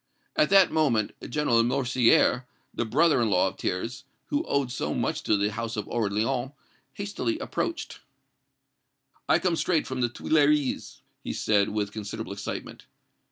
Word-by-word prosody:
At 150 Hz, -, +3 dB
that 195 Hz, -1 st, +6 dB
moment 130 Hz, -10 st, +2 dB, 0.2 s
General 120 Hz, -4 st, +2 dB
Lamoricière, 125 Hz, 0 st, +3 dB, 0.3 s
the 120 Hz, -, -2 dB
brother 150 Hz, +5 st, +3 dB
in 115 Hz, -, +2 dB
law 95 Hz, -1 st, +3 dB
of 95 Hz, -, -16 dB
Thiers, 115 Hz, +7 st, -3 dB, 0.3 s
who 295 Hz, +2 st, 0 dB
owed 140 Hz, -3 st, 0 dB
so -, -, -2 dB
much -, -, -1 dB
to 105 Hz, -, +2 dB
the 100 Hz, +1 st, 0 dB
house 115 Hz, +1 st, -4 dB
of 105 Hz, -, -2 dB
Orléans, 120 Hz, +5 st, -1 dB, 0.4 s
hastily 205 Hz, +11 st, -3 dB
approached. 335 Hz, +1 st, -4 dB, 1.3 s
"I -, -, +6 dB
come 180 Hz, -3 st, 0 dB
straight 165 Hz, -1 st, +1 dB
from 130 Hz, -1 st, -4 dB
the 120 Hz, -, +2 dB
Tuileries," 150 Hz, +2 st, +1 dB, 0.2 s
he -, -, -4 dB
said, 100 Hz, -2 st, +2 dB
with 105 Hz, -1 st, -2 dB
considerable 110 Hz, 0 st, -6 dB
excitement. 100 Hz, 0 st, -7 dB
120 Hz, 150 wpm, -27 LUFS, 110-150 Hz, 1.3 s, that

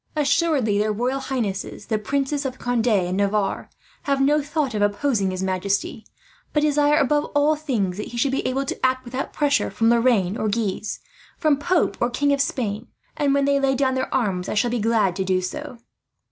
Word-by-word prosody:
Assuredly 280 Hz, -7 st, +2 dB
their 215 Hz, +1 st, +1 dB
royal 250 Hz, +5 st, -1 dB
highnesses, 220 Hz, -7 st, -3 dB
the 220 Hz, -2 st, -1 dB
Princes 280 Hz, +5 st, -1 dB
of 260 Hz, -1 st, -4 dB
Conde 245 Hz, -1 st, -1 dB
and 185 Hz, -5 st, +2 dB
Navarre, 200 Hz, 0 st, 0 dB, 0.4 s
have 275 Hz, -1 st, +2 dB
no 295 Hz, +2 st, +3 dB
thought 290 Hz, -2 st, -2 dB
of 210 Hz, -, -1 dB
opposing 205 Hz, 0 st, +1 dB
his 185 Hz, 0 st, -3 dB
majesty; 195 Hz, +3 st, -2 dB, 0.5 s
but 300 Hz, -, +2 dB
desire, 295 Hz, 0 st, +3 dB
above 295 Hz, 0 st, +2 dB
all 295 Hz, +2 st, +4 dB
things, 230 Hz, -, -2 dB
that 210 Hz, -, -4 dB
he 240 Hz, -, -8 dB
should 270 Hz, +3 st, +1 dB
be 270 Hz, -, -1 dB
able 270 Hz, +2 st, -1 dB
to -, -, -5 dB
act 260 Hz, 0 st, +1 dB
without 255 Hz, +3 st, -4 dB
pressure 290 Hz, -1 st, +1 dB
from 225 Hz, 0 st, +2 dB
Lorraine 230 Hz, -5 st, +2 dB
or 215 Hz, -, -1 dB
Guise, 210 Hz, -1 st, -2 dB, 0.4 s
from 310 Hz, -4 st, +3 dB
pope 320 Hz, -, +1 dB
or 240 Hz, -, +2 dB
King 285 Hz, +3 st, +1 dB
of 280 Hz, -, +1 dB
Spain; 225 Hz, -4 st, -2 dB, 0.3 s
and 285 Hz, -2 st, +1 dB
when 280 Hz, 0 st, +2 dB
they 280 Hz, 0 st, +2 dB
lay 270 Hz, -1 st, +2 dB
down 265 Hz, 0 st, +1 dB
their 260 Hz, 0 st, -2 dB
arms, 195 Hz, -8 st, -1 dB
I -, -, -2 dB
shall 235 Hz, +3 st, +1 dB
be 240 Hz, -, -1 dB
glad 215 Hz, -4 st, +2 dB
to 190 Hz, -, 0 dB
do 185 Hz, 0 st, +1 dB
so. 250 Hz, +8 st, -6 dB
250 Hz, 200 wpm, -23 LUFS, 205-280 Hz, 0.5 s, all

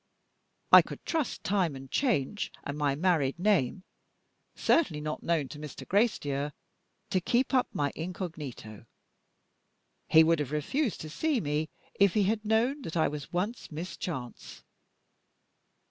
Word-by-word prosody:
I -, -, +11 dB
could -, -, -10 dB
trust 320 Hz, -6 st, -2 dB
time 185 Hz, -7 st, +1 dB
and 135 Hz, 0 st, -10 dB
change, 210 Hz, -, 0 dB
and 140 Hz, -, -4 dB
my 145 Hz, -2 st, +1 dB
married 155 Hz, -4 st, +1 dB
name 185 Hz, -4 st, +1 dB, 0.7 s
(certainly 180 Hz, -, +2 dB
not 155 Hz, 0 st, -4 dB
known 165 Hz, -5 st, 0 dB
to 150 Hz, -, -9 dB
Mr. 150 Hz, -2 st, -8 dB
Gracedieu) 150 Hz, -, +1 dB, 0.6 s
to 185 Hz, -, +2 dB
keep 245 Hz, +9 st, +1 dB
up 255 Hz, -2 st, +3 dB
my 145 Hz, -1 st, -1 dB
incognito. 155 Hz, -, -6 dB, 1.2 s
He 160 Hz, -, +7 dB
would 165 Hz, 0 st, +3 dB
have 145 Hz, -2 st, -3 dB
refused 220 Hz, -, -1 dB
to 155 Hz, -, -6 dB
see 310 Hz, -, 0 dB
me 150 Hz, -2 st, -1 dB, 0.3 s
if 200 Hz, -2 st, +5 dB
he 210 Hz, -, +4 dB
had 215 Hz, +2 st, 0 dB
known 230 Hz, +7 st, +1 dB
that 165 Hz, -8 st, -5 dB
I 160 Hz, -, +3 dB
was 150 Hz, -1 st, -7 dB
once 200 Hz, +6 st, -3 dB
Miss 170 Hz, +4 st, -5 dB
Chance." 130 Hz, -9 st, -6 dB
165 Hz, 145 wpm, -29 LUFS, 145-210 Hz, 1.2 s, I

